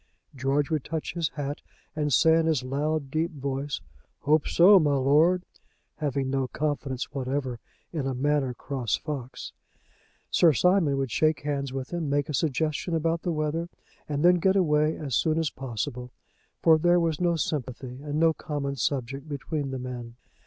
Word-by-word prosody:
George 135 Hz, +2 st, 0 dB
would 155 Hz, -4 st, 0 dB
touch 160 Hz, 0 st, -4 dB
his 170 Hz, -2 st, -1 dB
hat 145 Hz, -1 st, -4 dB, 0.3 s
and 150 Hz, -1 st, -1 dB
say 160 Hz, +6 st, +5 dB
in 165 Hz, 0 st, +2 dB
his 155 Hz, -6 st, +1 dB
loud, 140 Hz, +2 st, -2 dB
deep 160 Hz, +3 st, 0 dB
voice, 140 Hz, -, -4 dB, 0.4 s
"Hope 150 Hz, +2 st, +2 dB
so, 190 Hz, +3 st, +7 dB
my 145 Hz, -4 st, +2 dB
lord," 155 Hz, +7 st, +4 dB, 0.5 s
having 140 Hz, -3 st, -1 dB
no 135 Hz, -1 st, 0 dB
confidence 140 Hz, -2 st, -3 dB
whatever 130 Hz, -2 st, -2 dB, 0.3 s
in 145 Hz, -5 st, -2 dB
a 135 Hz, -, -2 dB
Manor 135 Hz, -1 st, 0 dB
Cross 125 Hz, -7 st, -2 dB
fox. 135 Hz, -4 st, -6 dB, 0.8 s
Sir 165 Hz, -3 st, +5 dB
Simon 175 Hz, -, +3 dB
would 135 Hz, -3 st, -2 dB
shake 155 Hz, +6 st, +2 dB
hands 140 Hz, -2 st, -2 dB
with 135 Hz, +4 st, -5 dB
him, 165 Hz, -4 st, -2 dB
make 145 Hz, +1 st, 0 dB
a -, -, -2 dB
suggestion 155 Hz, +3 st, 0 dB
about 165 Hz, +1 st, 0 dB
the 175 Hz, -, -1 dB
weather, 160 Hz, +2 st, -2 dB, 0.4 s
and 145 Hz, +2 st, 0 dB
then 180 Hz, 0 st, +6 dB
get 190 Hz, +3 st, +3 dB
away 155 Hz, -4 st, +2 dB
as 140 Hz, -4 st, -5 dB
soon 155 Hz, +5 st, +2 dB
as 160 Hz, -2 st, 0 dB
possible; 125 Hz, 0 st, -5 dB, 0.5 s
for 160 Hz, -1 st, +6 dB
there 175 Hz, +2 st, +4 dB
was 165 Hz, -1 st, 0 dB
no 175 Hz, -1 st, +2 dB
sympathy 130 Hz, -4 st, -4 dB
and 150 Hz, +1 st, -3 dB
no 165 Hz, 0 st, +4 dB
common 140 Hz, -3 st, -4 dB
subject 135 Hz, +3 st, -2 dB
between 145 Hz, 0 st, -3 dB
the 135 Hz, -, -4 dB
men. 125 Hz, -2 st, -7 dB
145 Hz, 170 wpm, -27 LUFS, 135-160 Hz, 0.8 s, so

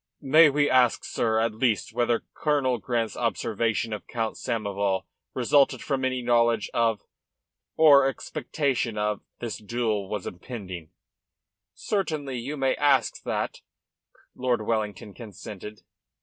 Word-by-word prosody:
"May 155 Hz, +3 st, +7 dB
we 145 Hz, +1 st, +2 dB
ask, 125 Hz, -3 st, +3 dB
sir, 110 Hz, -1 st, 0 dB
at 110 Hz, 0 st, +1 dB
least 110 Hz, -2 st, 0 dB
whether 120 Hz, 0 st, +1 dB
Colonel 140 Hz, -5 st, +1 dB
Grant's 115 Hz, -1 st, -1 dB
observation 115 Hz, 0 st, -1 dB
of 105 Hz, -, -7 dB
Count 115 Hz, -2 st, -2 dB
Samoval 100 Hz, -5 st, -1 dB, 0.3 s
resulted 130 Hz, 0 st, +3 dB
from 135 Hz, -2 st, -1 dB
any 130 Hz, -1 st, -1 dB
knowledge 120 Hz, -2 st, +2 dB
of, 115 Hz, -3 st, +1 dB, 0.7 s
or 145 Hz, -4 st, +7 dB
expectation 135 Hz, -4 st, -2 dB
of, 105 Hz, 0 st, -1 dB, 0.2 s
this 120 Hz, -2 st, -4 dB
duel 110 Hz, -2 st, -1 dB
that -, -, -13 dB
was 105 Hz, -3 st, -3 dB
impending?" 90 Hz, -4 st, -7 dB, 0.9 s
"Certainly 155 Hz, -, -2 dB
you 140 Hz, +6 st, -5 dB
may 135 Hz, -1 st, +2 dB
ask 145 Hz, -2 st, +2 dB
that," -, -, -2 dB, 0.7 s
Lord 125 Hz, -3 st, 0 dB
Wellington, 105 Hz, -3 st, -2 dB
consented. 105 Hz, -1 st, -9 dB
115 Hz, 125 wpm, -26 LUFS, 105-130 Hz, 0.9 s, May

